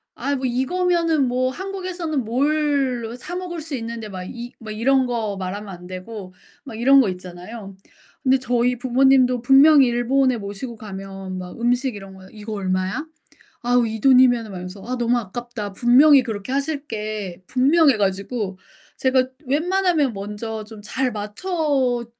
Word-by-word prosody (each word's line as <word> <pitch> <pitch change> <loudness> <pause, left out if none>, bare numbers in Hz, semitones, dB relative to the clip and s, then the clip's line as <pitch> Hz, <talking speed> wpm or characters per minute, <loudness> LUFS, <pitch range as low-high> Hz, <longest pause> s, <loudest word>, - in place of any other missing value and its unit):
"아이 280 +3 -1
뭐 260 - -3
이거면은 330 +3 +1
뭐 255 +1 0
한국에서는 365 -6 -4
뭘로 265 -2 0
사 350 +8 -7
먹을 355 -2 -5
수 305 -2 -5
있는데" 230 -2 -5
막 185 -1 -6
이 240 0 -8
뭐 220 -2 -8
이런 260 +4 +2
거 220 -5 -2
말하면 195 +2 -5
안 180 -2 -9
되고 185 +1 -8 0.3
막 240 - -8
이런 270 +3 +6
거 210 - +1
있잖아요. 185 +3 -8 0.5
근데 265 0 +3
저희 250 -1 +1
부모님도 255 -1 +3
분명히 275 +2 +7
일본에 250 +1 +2
모시고 205 +4 -6
가면 195 -2 -7
막 180 +4 -8
음식 245 +1 +1
이런 195 -1 -10
거에 190 0 -14
"이거 215 0 -8
얼마야? 185 +6 -2 0.6
아우, 245 0 +3
이 220 0 -4
돈이면은" 250 -2 +5
막 - - -7
이러면서 185 +2 -8
"아 255 +2 -3
너무 240 +1 +2
아깝다." 230 -1 -6
분명히 260 +6 +6
그렇게 220 +1 -5
하실 285 +1 -2
게 210 -4 -5
분명해 275 +1 +4
가지고 195 0 -2 0.4
제가 260 -1 +3 0.2
웬만하면 325 -1 +1
먼저 210 +2 -5
좀 215 -1 -12
잘 260 +5 -1
맞춰 250 - -1
240 Hz, 320 characters per minute, -22 LUFS, 210-270 Hz, 0.6 s, 분명히